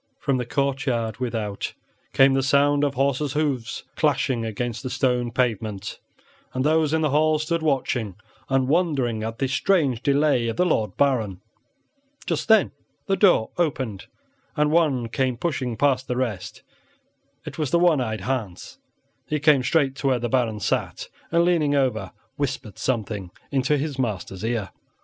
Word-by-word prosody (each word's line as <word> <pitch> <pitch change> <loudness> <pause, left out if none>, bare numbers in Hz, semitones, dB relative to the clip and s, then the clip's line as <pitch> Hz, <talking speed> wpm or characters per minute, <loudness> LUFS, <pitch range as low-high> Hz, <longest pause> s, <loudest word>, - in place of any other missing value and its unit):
From 140 -3 0
the 125 -2 -3
courtyard 130 -5 -1
without 115 -5 -3 0.4
came 135 0 +5
the 135 - +2
sound 145 +1 +3
of 140 -1 0
horses' 140 +1 0
hoofs 140 -7 -2
clashing 120 -4 +1
against 115 +1 -3
the 130 - -4
stone 125 -2 0
pavement, 110 -5 -2 0.6
and 130 +1 0
those 155 -1 +3
in 160 0 +1
the 155 -3 +1
hall 155 +2 +3
stood 160 +2 -1
watching 125 - -1 0.3
and 135 -1 +2
wondering 140 -8 +1
at 115 +1 -4
this 135 0 -1
strange 145 -7 +2
delay 140 -4 +2
of 115 - -3
the 180 - +3
Lord 110 - 0
Baron. 115 -10 +1 0.9
Just 160 -5 -2
then 220 -3 +5 0.3
the 195 - +1
door 180 - +4
opened 125 - -1 0.5
and 150 0 +2
one 150 -8 +2
came 130 +1 -1
pushing 130 -6 -2
past 135 -2 +2
the 125 - -2
rest; 115 -8 -3 0.8
it 155 -1 -8
was 150 -3 0
the 170 - +3
one 170 -5 +4
eyed 110 -3 -3
Hans. 115 -9 -4 0.5
He 150 - -1
came 145 -2 +4
straight 135 0 +2
to 140 - -1
where 130 -2 +2
the 120 - -2
Baron 115 -4 0
sat, - - -2 0.2
and, 170 +1 +3
leaning 155 -5 +2
over, 120 -8 0 0.3
whispered 135 -7 -4
something 105 -6 -2 0.2
into 140 +1 +2
his 140 -1 -3
master's 105 -5 -3
ear. 110 -4 -2
130 Hz, 160 wpm, -24 LUFS, 115-150 Hz, 0.9 s, came